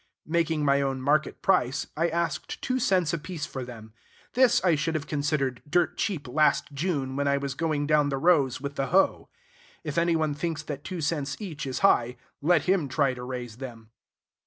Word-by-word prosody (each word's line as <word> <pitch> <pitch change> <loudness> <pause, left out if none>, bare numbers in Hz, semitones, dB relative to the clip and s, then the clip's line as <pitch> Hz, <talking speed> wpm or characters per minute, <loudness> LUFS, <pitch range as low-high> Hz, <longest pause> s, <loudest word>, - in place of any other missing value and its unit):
Making 160 -2 0
my 140 0 +3
own 135 -1 -1
market 150 +4 0
price, 130 -9 +2
I 170 +2 +1
asked 170 0 -2
two 255 0 0
cents 185 - +2
apiece 165 -1 -4
for 130 -4 -6
them. 110 -3 -10 0.4
This 255 0 +5
I 180 -3 +4
should 160 +2 0
have 155 -1 -2
considered 145 -4 -1
dirt 175 +2 +2
cheap 160 -10 -2
last 150 +3 +2
June, 140 -4 -2
when 140 0 0
I 140 0 +3
was 140 -1 -3
going 150 -1 -1
down 150 -1 +3
the 135 - -1
rows 140 -4 +3
with 140 +1 -6
the 135 - 0
hoe. 190 +3 +2 0.5
If 150 0 -1
any 170 0 +2
one 155 -2 +1
thinks 160 +1 -3
that 145 -2 -6
two 180 +2 -5
cents 145 -2 -1
each 155 -9 -5
is 130 -1 -3
high, 125 -9 +3 0.2
let 165 +1 +3
him 185 -5 +2
try 135 0 +2
to 125 - -8
raise 125 -3 -6
them. 115 -4 -9
150 Hz, 195 wpm, -27 LUFS, 135-170 Hz, 0.5 s, This